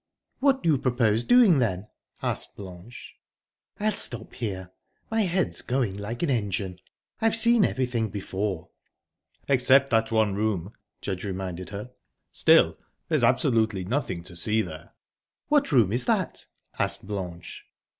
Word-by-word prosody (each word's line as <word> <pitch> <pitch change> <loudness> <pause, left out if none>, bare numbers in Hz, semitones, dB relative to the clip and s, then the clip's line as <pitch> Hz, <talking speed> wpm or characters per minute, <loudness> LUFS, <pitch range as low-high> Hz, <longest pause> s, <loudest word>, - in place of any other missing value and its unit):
"What 270 -1 +2
do 165 - +2
you 140 - +2
propose 120 -3 +1
doing, 230 - +6
then?" 100 -4 -1 0.4
asked - - -3
Blanche. 95 +4 -11 0.6
"I'll 215 +1 +2
stop 120 - -4
here; 95 -6 -5 0.4
my 225 0 +2
head's 185 -2 0
going 125 -6 -1
like 105 +6 -5
an 160 - +1
engine. 100 -5 -2 0.4
I've 225 0 +3
seen 235 -1 +5
everything 125 - 0
before." 95 -3 -4 0.8
"Except 135 0 +4
that 115 0 +2
one 110 -3 +2
room," 100 -2 -2 0.3
Judge 95 -2 -4
reminded 95 -3 -5
her. 105 +5 -7 0.4
"Still, - - +4 0.3
there's - - +2
absolutely 110 -5 +2
nothing 105 -6 -2
to 90 0 -10
see 110 +5 +2
there." 80 -2 -10 0.5
"What 290 - +3
room 115 -8 +4
is 125 +1 +1
that?" - - 0 0.3
asked - - 0
Blanche. 90 -4 -6
110 Hz, 135 wpm, -26 LUFS, 95-130 Hz, 0.8 s, doing